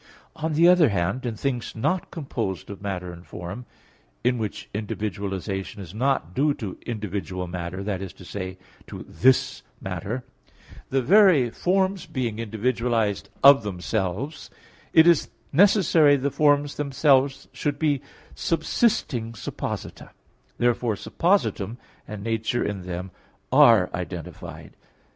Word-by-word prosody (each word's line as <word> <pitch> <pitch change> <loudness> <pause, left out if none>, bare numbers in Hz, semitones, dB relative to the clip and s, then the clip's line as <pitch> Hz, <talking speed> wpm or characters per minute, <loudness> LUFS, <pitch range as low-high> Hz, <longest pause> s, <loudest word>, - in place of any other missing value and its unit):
On 155 0 -2
the 165 +3 +5
other 180 -5 +6
hand, 100 +6 -1
in 115 - -3
things 125 0 -3
not 180 +11 -1
composed 115 - -4
of 100 - -9
matter 90 -3 -4
and 85 0 -12
form, 95 +8 -8 0.6
in 125 0 +2
which 110 -2 -4
individualization 100 -2 -4
is 90 -3 -9
not 120 - 0
due 145 +4 +2
to 100 -5 -6
individual 100 -5 -4
matter 90 +2 -5
that 100 -2 -3
is 95 -2 -6
to 95 - -14
say, 95 -1 -6 0.3
to - - -8
this 130 +1 +2 0.2
matter 95 +7 -4 0.7
the 135 -1 +1
very 175 - +5
forms 190 +3 0
being 125 -8 -3
individualized 115 -1 -1
of 140 -1 +9
themselves 105 - -3 0.4
it 160 -1 +7
is 170 -3 +4 0.2
necessary 165 -4 +5
the 140 +1 -1
forms 145 0 +2
themselves 135 -1 +2
should 140 +2 -2
be 145 -3 +1 0.3
subsisting 160 - 0
supposita. 110 - -6 0.5
Therefore 120 -2 +1
suppositum 120 - 0 0.3
and 105 -2 -7
nature 115 +1 -1
in 100 -2 -3
them 90 +1 -6 0.4
are 110 -6 +6
identified. 90 -2 -7
115 Hz, 125 wpm, -25 LUFS, 95-145 Hz, 0.7 s, of